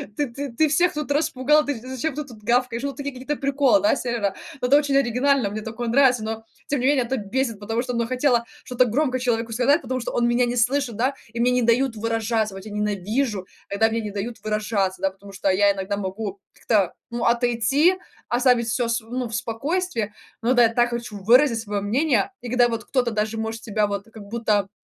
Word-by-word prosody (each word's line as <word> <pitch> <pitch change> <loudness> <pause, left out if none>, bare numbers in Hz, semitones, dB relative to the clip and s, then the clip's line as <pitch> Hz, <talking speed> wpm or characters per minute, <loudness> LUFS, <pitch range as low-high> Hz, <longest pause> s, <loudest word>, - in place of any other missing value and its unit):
ты 290 -2 0
ты 280 -1 -5
ты 310 +4 +2
всех 350 +4 +3
тут 300 -1 -4
распугал, 300 0 +2
ты 285 -4 -2
зачем 260 +4 -3
ты 300 - -3
тут 240 -6 -13
гавкаешь?" 240 +1 +1
Ну, 280 -1 -2
такие 280 -1 -5
какие-то 260 +4 -3
приколы, 280 +1 +2
да, 310 -2 +3
сервера. 230 -6 -1 0.3
Но 250 - +1
это 285 - +7
очень 285 -2 +1
оригинально, 260 -2 +2
мне 215 - -4
такое 230 +2 -4
нравится, 250 -3 +4
но 225 0 -5 0.2
тем 285 -2 0
не 255 - -1
менее 280 -3 +3
это 260 +2 -2
бесит, 230 +1 -2
потому 225 +3 -2
что, 250 0 -4
ну, 235 -1 0
хотела 250 -2 +2 0.2
что-то 250 0 +2
громко 255 +2 0
человеку 235 -2 -1
сказать, 265 +7 +3
потому 255 0 -3
что 235 - -5
он 235 - +2
меня 245 +1 +3
не 240 +1 -2
слышит, 245 0 +1
да, 255 +5 +1 0.2
и 235 - -2
мне 250 +1 +3
не 250 0 +2
дают 235 0 +2
выражаться, 225 -2 -1
вот 195 - -8
я 215 - -8
ненавижу, 210 +1 -1 0.2
когда 225 +3 +2
мне 230 +1 -1
не 210 -2 -4
дают 220 +4 -4
выражаться, 210 -3 -1
да. 195 - +1
Потому 195 +1 -14
что 195 0 -1
я 200 +1 +4
иногда 195 +1 -3
могу 200 0 -4
как-то, 200 -6 +1 0.2
ну, 235 0 -3
отойти, 245 +8 +3 0.3
оставить 240 -1 +3
всё 230 +2 0
св 230 0 -3
ну, 250 -1 -2
в 225 - -5
спокойствии, 240 - -2 0.3
но 240 +3 +2
да, 245 -1 +6
я 225 - +5
так 240 +1 +1
хочу 235 -3 -5
выразить 235 +3 +5
своё 205 -2 -3
мнение. 245 - +1
И 245 - -7
когда 245 -1 +4
вот 230 -1 -4
кто-то 245 -3 0
даже 215 +1 -1
может 225 +1 -4
тебя 210 -1 0
вот 200 -1 -4
как 215 -2 -10
будто 210 -4 0
235 Hz, 220 wpm, -23 LUFS, 215-260 Hz, 0.3 s, это